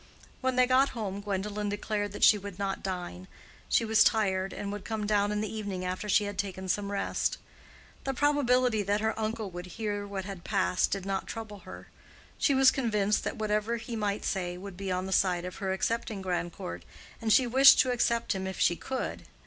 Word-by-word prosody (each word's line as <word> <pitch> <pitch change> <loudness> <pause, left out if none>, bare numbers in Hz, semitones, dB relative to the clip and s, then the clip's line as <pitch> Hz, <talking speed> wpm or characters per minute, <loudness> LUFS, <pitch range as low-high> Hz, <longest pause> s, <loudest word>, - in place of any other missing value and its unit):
When 260 -1 0
they 250 0 +5
got 260 +2 +4
home 200 -2 -3
Gwendolen 205 +1 -2
declared 205 0 -2
that - - -4
she - - +8
would 200 -2 -8
not 195 -1 -2
dine. 175 - -5 0.4
She 230 - +3
was 220 0 +5
tired, 195 -3 +1
and 200 - -5
would 205 -1 -6
come 220 -1 -3
down 205 -1 +2
in 210 0 -1
the 215 -1 -4
evening 200 -4 -4
after 185 +3 -3
she 210 - +4
had 205 -1 -5
taken 190 -1 -3
some 200 +2 -1
rest. 200 - -1 0.7
The 270 -1 -2
probability 255 -5 +3
that 205 +1 0
her 220 0 +1
uncle 220 -2 -3
would 175 +1 -7
hear 205 -2 -2
what 195 -2 -5
had 195 -3 -7
passed 190 -3 +1
did 195 -2 -3
not 195 -1 -2
trouble 220 -3 -7
her. - - -11 0.5
She 280 - +3
was 265 0 +6
convinced 210 -5 +1
that - - -3
whatever 215 +2 0
he 230 +1 -6
might 210 -2 -2
say 180 -2 -2
would 195 0 -8
be 195 0 -4
on 185 0 -1
the 190 - -5
side 180 -2 +2
of 180 - -7
her 190 -2 -2
accepting 210 +1 -2
Grandcourt, 175 - -4 0.4
and 225 -1 0
she 260 - +6
wished 265 +3 +8
to 255 - 0
accept 235 -2 +1
him 190 -1 -3
if 190 - -5
she 175 - +3
could. 260 +8 -5
205 Hz, 205 wpm, -29 LUFS, 190-220 Hz, 0.7 s, she